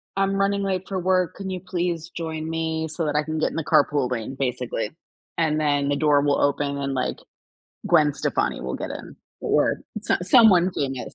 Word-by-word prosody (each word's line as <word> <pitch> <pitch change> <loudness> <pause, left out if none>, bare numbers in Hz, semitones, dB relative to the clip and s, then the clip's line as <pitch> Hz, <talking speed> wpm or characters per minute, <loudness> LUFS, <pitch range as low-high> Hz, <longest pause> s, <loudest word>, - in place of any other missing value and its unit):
I'm 195 0 +1
running 200 0 +1
late 190 -1 -2
for 190 -2 -2
work, 185 -1 +1
can 195 0 -6
you 185 -1 -3
please 175 -2 -3
join 160 -1 -4
me, 160 0 -2
so 160 +1 -3
that 150 0 -1
I 150 - +2
can 155 0 -3
get - - +1
in - - -9
the 160 - -1
carpool 140 -3 +3
lane," 125 +2 -4
basically. 125 -4 -2 0.5
And 155 -2 +1
then 145 -2 +1
the 145 - +2
door 150 -2 +4
will 145 -1 +2
open, 140 0 0
and, 140 -1 -2
like, 130 - -1 0.7
Gwen 155 -4 +4
Stefani - - -1
will 65 0 -4
get - - -5
in, - - -8 0.3
o - - -4
or - - +2 0.2
so - - +1
someone 185 -3 +6
famous. 135 -3 -3
160 Hz, 205 wpm, -24 LUFS, 140-180 Hz, 0.7 s, someone